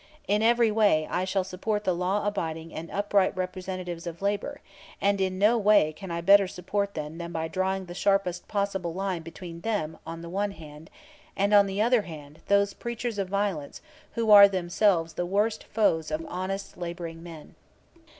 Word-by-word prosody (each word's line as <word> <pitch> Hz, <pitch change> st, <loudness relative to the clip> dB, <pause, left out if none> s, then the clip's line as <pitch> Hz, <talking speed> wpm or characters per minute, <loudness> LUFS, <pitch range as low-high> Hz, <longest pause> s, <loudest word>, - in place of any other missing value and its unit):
In 210 Hz, +2 st, +2 dB
every 235 Hz, 0 st, +4 dB
way 205 Hz, -8 st, +3 dB
I 180 Hz, -, 0 dB
shall 190 Hz, 0 st, 0 dB
support 205 Hz, +3 st, -3 dB
the 185 Hz, -, +1 dB
law 185 Hz, +4 st, -1 dB
abiding 165 Hz, -5 st, -3 dB
and 165 Hz, +1 st, -7 dB
upright 200 Hz, -1 st, +1 dB
representatives 185 Hz, -2 st, -5 dB
of 170 Hz, 0 st, -6 dB
labor, 205 Hz, +8 st, -2 dB, 0.4 s
and 200 Hz, 0 st, +1 dB
in 185 Hz, -1 st, 0 dB
no 215 Hz, +4 st, +4 dB
way 205 Hz, -7 st, +4 dB
can 190 Hz, +4 st, -9 dB
I 170 Hz, 0 st, -3 dB
better 195 Hz, +2 st, +6 dB
support 200 Hz, +3 st, -3 dB
them 155 Hz, +2 st, -5 dB
than 170 Hz, 0 st, -6 dB
by 160 Hz, -1 st, -2 dB
drawing 190 Hz, +3 st, -1 dB
the 175 Hz, -, -8 dB
sharpest 195 Hz, -1 st, 0 dB
possible 195 Hz, -4 st, -2 dB
line 190 Hz, -3 st, -2 dB
between 165 Hz, +1 st, -9 dB
them 195 Hz, -8 st, -2 dB
on 165 Hz, +1 st, -7 dB
the -, -, -7 dB
one 200 Hz, +2 st, -1 dB
hand, 155 Hz, -2 st, -12 dB, 0.5 s
and, 200 Hz, +1 st, +2 dB
on 200 Hz, -1 st, +7 dB
the 195 Hz, +2 st, 0 dB
other 240 Hz, 0 st, +3 dB
hand, 155 Hz, -5 st, -11 dB
those 200 Hz, 0 st, +3 dB
preachers 235 Hz, -2 st, -4 dB
of 190 Hz, -2 st, -2 dB
violence 195 Hz, -7 st, -2 dB, 0.4 s
who 230 Hz, -2 st, +1 dB
are 200 Hz, -1 st, +11 dB
themselves 180 Hz, -2 st, +1 dB
the 175 Hz, -, -2 dB
worst 210 Hz, +4 st, 0 dB
foes 165 Hz, -8 st, +1 dB
of 155 Hz, +1 st, -2 dB
the -, -, -10 dB
honest 190 Hz, +2 st, -4 dB
laboring 170 Hz, -1 st, -6 dB
man. 165 Hz, -3 st, -11 dB
190 Hz, 185 wpm, -27 LUFS, 170-205 Hz, 0.5 s, are